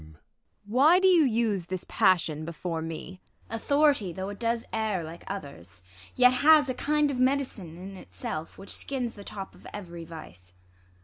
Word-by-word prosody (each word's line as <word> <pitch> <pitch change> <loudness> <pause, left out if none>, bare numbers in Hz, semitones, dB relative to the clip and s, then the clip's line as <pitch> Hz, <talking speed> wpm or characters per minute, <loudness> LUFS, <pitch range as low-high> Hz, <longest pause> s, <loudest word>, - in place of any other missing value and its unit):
Why 270 - +5
do 380 - +4
you 355 -4 +6
use 220 -7 0
this 185 -1 -4
passion 160 -4 +2
before 165 0 -4
me? 165 +3 -7 0.3
IsAB. - - -2
Authority, 280 - +2
though 190 +2 -5
it 205 - -8
does 230 0 -1
err 215 -5 -1
like 160 +2 -9
others. 140 - -8 0.3
Yet 250 0 +6
has 300 -2 +6
a - - 0
kind 295 +3 +1
of 265 - -3
med'cine 255 - 0
in 190 +2 -8
itself, 155 - -6
"Which 195 - -8
skins 250 -4 -3
the 205 - -11
top 195 -1 -7
of - - -14
every 175 -5 -8
vice. 95 - -12
200 Hz, 170 wpm, -28 LUFS, 170-255 Hz, 0.3 s, you